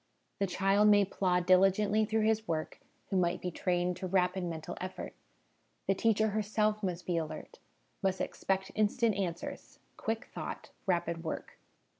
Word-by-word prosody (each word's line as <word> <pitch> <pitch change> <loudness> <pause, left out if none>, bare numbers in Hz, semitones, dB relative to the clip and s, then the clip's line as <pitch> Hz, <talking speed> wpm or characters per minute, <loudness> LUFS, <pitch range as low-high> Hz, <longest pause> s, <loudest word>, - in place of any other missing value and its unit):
The 200 - +2
ch'.ld 195 +3 +3
may 205 -1 +6
//^diligently 190 +4 +3
through 220 0 +2
his 220 0 +1
work 160 -1 -2 0.3
who 195 - +2
might 180 0 +2
be 180 - -3
trained 175 +1 0
to 185 - -4
rapid 180 0 +1
mental 165 0 -5
effort. 185 +1 -5 0.7
The 195 - +3
teacher 220 +2 +2
herself 215 0 0
must 180 -3 -3
be 175 -2 0
alert, 160 -2 -5 0.4
must 190 -2 +1
expect 190 0 -1
instant 220 +2 +2
answers, 180 -4 -4 0.2
quick 225 +1 -2
thought, - - -6 0.2
rapid 170 -2 0
work. 160 - -5
190 Hz, 145 wpm, -32 LUFS, 180-210 Hz, 0.7 s, may